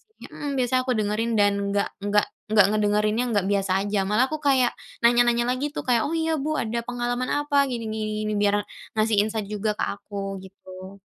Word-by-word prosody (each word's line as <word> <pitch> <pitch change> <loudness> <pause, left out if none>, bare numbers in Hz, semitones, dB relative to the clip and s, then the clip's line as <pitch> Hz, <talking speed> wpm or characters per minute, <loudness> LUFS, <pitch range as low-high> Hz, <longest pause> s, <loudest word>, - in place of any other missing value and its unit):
sih. 440 0 -38 0.2
Hmm, 290 - -5
biasanya 255 0 +2
aku 255 - +1
dengerin 215 +2 0
dan 205 -1 +4 0.2
nggak 200 0 0 0.2
nggak 205 0 +3 0.3
nggak 205 -3 +7
ngedengerinnya, 210 +2 +1
nggak 195 -2 +1
biasa 195 -2 +1
aja. 205 0 -1
Malah 215 +5 +3
aku 310 - -2
kayak 265 -4 +3 0.3
nanya-nanya 240 0 +4
lagi 255 +4 -1
tuh. - - -3
Kayak, 235 -2 +3
"Oh 325 - -2
iya 320 0 0
Bu 310 +2 -1
ada 230 +1 -2
pengalaman 245 +1 -2
apa?" 290 -1 -1
"Gini 235 -2 -3
gini 215 0 -3
gini," 215 - -1
biar 205 0 +3 0.4
ngasih 215 0 +2
insight 215 0 -2
juga 210 +1 -1
ke - - 0
aku 195 -1 -5
gitu. 190 0 -12
220 Hz, 195 wpm, -24 LUFS, 205-245 Hz, 0.4 s, nggak